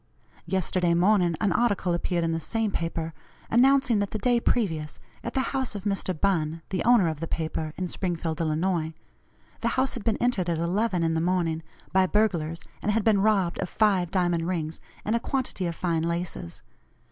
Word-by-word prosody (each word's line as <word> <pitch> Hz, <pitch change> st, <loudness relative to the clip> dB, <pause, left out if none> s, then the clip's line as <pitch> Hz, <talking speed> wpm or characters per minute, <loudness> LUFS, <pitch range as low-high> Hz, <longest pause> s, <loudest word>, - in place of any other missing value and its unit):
Yesterday 180 Hz, -1 st, +1 dB
morning 180 Hz, -1 st, +3 dB
an 205 Hz, -, +2 dB
article 205 Hz, -5 st, +1 dB
appeared 175 Hz, 0 st, 0 dB
in 165 Hz, -, 0 dB
the 165 Hz, -, -1 dB
same 220 Hz, +6 st, -1 dB
paper, 165 Hz, -2 st, -3 dB, 0.4 s
announcing 260 Hz, -1 st, +4 dB
that 205 Hz, -1 st, 0 dB
the -, -, -3 dB
day 240 Hz, +2 st, +2 dB
previous, 165 Hz, -11 st, -1 dB, 0.2 s
at -, -, -5 dB
the 265 Hz, -, +3 dB
house 260 Hz, -5 st, -1 dB
of 200 Hz, -, -5 dB
Mr. 195 Hz, -2 st, -1 dB
Bunn 165 Hz, -4 st, 0 dB
(the 190 Hz, -, -1 dB
owner 235 Hz, -7 st, +5 dB
of 155 Hz, -2 st, -2 dB
the 165 Hz, -, -3 dB
paper), 160 Hz, -1 st, -3 dB
in 185 Hz, -, -2 dB
Springfield, 170 Hz, -3 st, -2 dB
Illinois 160 Hz, 0 st, 0 dB, 0.6 s
the 235 Hz, -, -1 dB
house 260 Hz, +1 st, +2 dB
had 235 Hz, -, -6 dB
been 225 Hz, -2 st, +1 dB
entered 205 Hz, -8 st, +1 dB
at 170 Hz, -, 0 dB
11 180 Hz, +2 st, 0 dB
in 165 Hz, 0 st, +1 dB
the 160 Hz, -, +1 dB
morning, 170 Hz, -2 st, 0 dB, 0.3 s
by 190 Hz, 0 st, +4 dB
burglars, 175 Hz, -6 st, 0 dB, 0.2 s
and 210 Hz, -, +1 dB
had 220 Hz, 0 st, +1 dB
been 210 Hz, -3 st, +4 dB
robbed 195 Hz, -5 st, +2 dB
of 180 Hz, -, -2 dB
five 195 Hz, -5 st, +2 dB
diamond 175 Hz, -3 st, +1 dB
rings, 165 Hz, -3 st, -3 dB, 0.2 s
and 220 Hz, -, +1 dB
a -, -, +2 dB
quantity 245 Hz, -8 st, -2 dB
of 170 Hz, -, -3 dB
fine 165 Hz, -2 st, 0 dB
laces. 170 Hz, -, -4 dB
180 Hz, 190 wpm, -26 LUFS, 165-210 Hz, 0.6 s, owner